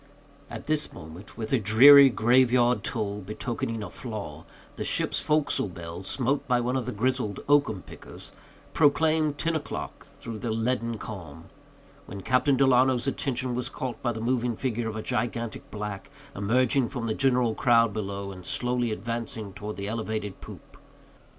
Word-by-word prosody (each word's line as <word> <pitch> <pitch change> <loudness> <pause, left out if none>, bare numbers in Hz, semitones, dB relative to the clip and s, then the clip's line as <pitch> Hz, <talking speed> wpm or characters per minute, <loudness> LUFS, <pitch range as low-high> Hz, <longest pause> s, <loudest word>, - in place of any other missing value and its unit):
At - - -8
this 155 0 +1
moment, 85 +6 -12
with 110 +2 -4
a 130 - +4
dreary 135 +7 +8
grave 120 +3 +3
yard 120 -3 +3
toll, 105 -4 -3
betokening 115 +2 -4
a 100 - -6
flaw, 105 - -7 0.3
the - - -4
ship's - - 0
forecastle 150 -7 +1
bell, 85 0 -8
smote 135 +8 -1
by 125 -1 +2
one 125 +2 -1
of 125 -3 -2
the - - -2
grizzled 120 -2 -1
oakum 140 -10 +2
pickers, - - -12 0.4
proclaimed 155 0 +2
ten 165 +2 -1
o'clock, 150 - -5
through 115 -2 -9
the 120 - -4
leaden 115 +1 -1
calm; 85 -7 -9 0.6
when 100 - -7
Captain 130 +6 +2
Delano's 130 -2 +3
attention 130 -2 -2
was 125 0 -2
caught 130 -2 -5
by 120 - 0
the 115 - -5
moving 120 0 0
figure 115 -1 -2
of 110 - -6
a 110 - -4
gigantic 120 -2 -3
black, 105 -2 -6 0.3
emerging 125 +5 +2
from 125 -2 -5
the 110 - -1
general 125 -2 +2
crowd 115 -2 +3
below, 100 -2 -4
and 90 -1 -10
slowly 125 +4 -1
advancing 115 -2 -4
towards 105 +2 -7
the 100 0 -4
elevated 110 -2 -4
poop. - - -12
115 Hz, 165 wpm, -27 LUFS, 105-130 Hz, 0.6 s, dreary